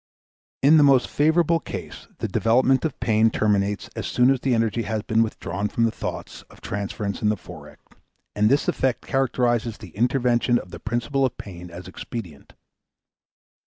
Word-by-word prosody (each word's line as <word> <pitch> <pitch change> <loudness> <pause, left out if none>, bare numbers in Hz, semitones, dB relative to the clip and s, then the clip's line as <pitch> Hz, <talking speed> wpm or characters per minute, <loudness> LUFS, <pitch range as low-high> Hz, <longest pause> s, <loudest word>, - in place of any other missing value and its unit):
In 150 +3 +7
the 150 - +6
most 135 -3 +5
favorable 165 +2 +2
case - - -8
the - - -3
development 130 +4 +2
of 155 - -3
pain 115 -2 +3
terminates 105 -2 0
as - - -4
soon 125 +2 +3
as 135 - +1
the 130 -1 +1
energy 115 0 0
has 110 -2 -3
been 110 0 +2
withdrawn 105 -3 -2
from 115 - -1
the 115 - +2
thoughts - - -6
of - - -17
transference 100 0 -4
in 105 - +2
the 105 - 0
Forec., 80 -5 -12 0.6
and 105 +1 +3
this 140 +3 +2
effect 130 -2 0
characterizes 120 -4 0
the 105 - -11
intervention 120 +1 +2
of 90 - -7
the 85 - -8
principle 120 +6 -1
of 130 - 0
pain 90 -3 -9
as 85 +1 -10
expedient. 95 -5 -8
115 Hz, 170 wpm, -23 LUFS, 105-130 Hz, 0.6 s, In